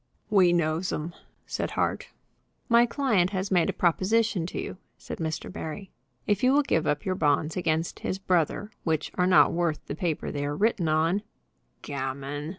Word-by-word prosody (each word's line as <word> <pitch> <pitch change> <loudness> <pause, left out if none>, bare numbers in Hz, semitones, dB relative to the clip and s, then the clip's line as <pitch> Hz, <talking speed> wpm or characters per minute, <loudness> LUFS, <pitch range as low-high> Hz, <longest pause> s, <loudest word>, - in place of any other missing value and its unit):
"We 185 -4 +5
knows 170 +1 0
'em," 160 +3 -4 0.3
said - - -3
Hart. - - 0 0.6
"My 235 0 +5
client 230 -9 +2
has 190 0 -3
made 175 -3 +3
a - - +3
proposition 185 +1 +1
to - - -5
you," - - -5 0.2
said - - -8
Mr. 160 -1 -3
Barry. 180 +5 -6 0.3
"If 205 +1 0
you 255 +1 +5
will 290 +1 +4
give 160 - 0
up 145 - 0
your 185 - +1
bonds 150 -2 +1
against 165 -2 -1
his 185 - -2
brother, 185 +2 0
which 160 -2 -1
are 180 0 +1
not 185 - +6
worth 170 -3 -1
the - - -5
paper 165 0 -2
they 145 -1 -3
are 145 +1 -2
written 210 -5 +1
on 160 +5 +2 0.3
" - - -44
"Gammon!" 140 +2 -4
175 Hz, 180 wpm, -27 LUFS, 155-195 Hz, 0.6 s, not